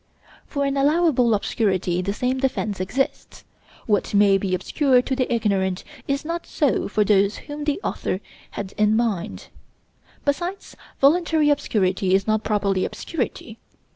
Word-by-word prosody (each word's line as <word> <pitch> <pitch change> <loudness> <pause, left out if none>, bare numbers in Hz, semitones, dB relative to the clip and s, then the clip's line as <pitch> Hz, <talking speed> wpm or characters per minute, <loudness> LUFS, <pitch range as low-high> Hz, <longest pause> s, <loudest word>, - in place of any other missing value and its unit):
For 280 -1 -1
an 275 0 -1
allowable 280 -5 +3
obscurity 190 -4 0
the 195 +2 -2
same 250 +5 -1
defense 235 -7 -1
exists. 220 +9 -3 0.4
What 205 -1 0
may 200 -1 +5
be 185 -1 0
obscure 250 - +2
to 265 - -2
the 255 -1 -1
ignorant 195 -5 0 0.2
is 275 +1 -1
not 335 +1 -4
so 290 -6 0
for 210 +1 +1
those 200 0 +2
whom 295 0 -6
the 295 +3 0
author 185 - -2 0.3
had 200 -1 -6
in 210 0 +4
mind. 220 -7 -2 0.8
Besides, 345 +7 -2 0.2
voluntary 315 0 +4
obscurity 190 -8 +1
is 195 - +1
not 215 0 +1
properly 200 -3 0
obscurity. 235 -6 -4
225 Hz, 140 wpm, -23 LUFS, 200-280 Hz, 0.8 s, may